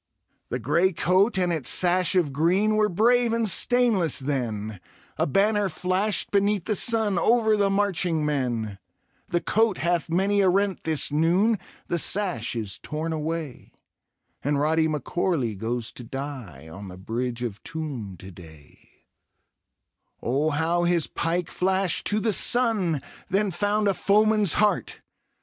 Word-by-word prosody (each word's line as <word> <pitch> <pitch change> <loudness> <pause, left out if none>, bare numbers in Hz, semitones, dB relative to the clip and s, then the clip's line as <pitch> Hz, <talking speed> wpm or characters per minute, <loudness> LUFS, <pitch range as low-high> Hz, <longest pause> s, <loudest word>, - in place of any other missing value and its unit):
The 125 - -2
grey 160 - +1
coat 185 +7 +2
and 180 -2 +1
its 155 -6 -1
sash 180 +1 +2
of 165 -7 +1
green 185 +9 +2
Were 215 0 +2
brave 235 +5 +2
and 230 -1 +1
stainless 210 - +2
then; 110 -8 -3 0.3
A - - 0
banner 205 +5 +2
flashed 185 +5 -1
beneath 200 -2 +1
the 215 - 0
sun 215 -3 +1
Over 220 0 +3
the 200 -1 +2
marching 180 -5 0
men 120 -8 -2 0.2
— - - -42
The 175 - -1
coat 220 -3 +1
hath 170 -1 -1
many 195 +4 +2
a 190 - +4
rent 195 +1 0
this 155 -2 0
nooni 180 +8 +2 0.3
The 170 - -1
sash 180 - -1
is 105 -4 -4
torn 155 +2 -4
away^ 160 -3 -4 0.7
And 145 0 0
Rody 160 +2 +2
M'Corlw 150 - -1
goes 115 +3 -3
to 125 - -10
die 120 - -7
On 95 +5 -9
the 90 -1 -10
Bridge 120 +5 -4
of 105 -4 -5
Toome 135 - -6
to 95 +3 -11
day; 80 -5 -15 1.4
Oh| 140 +6 0
how 165 +3 0
his 175 -2 +2
pike 170 +1 -2
flashed 190 0 0
to 210 - +1
the 220 0 0
sun! 205 - +1 0.3
Then 200 +1 +1
found 205 +3 0
a 200 - +3
foeman's 210 -1 +2
heart! 210 -1 0
170 Hz, 150 wpm, -25 LUFS, 135-200 Hz, 1.4 s, a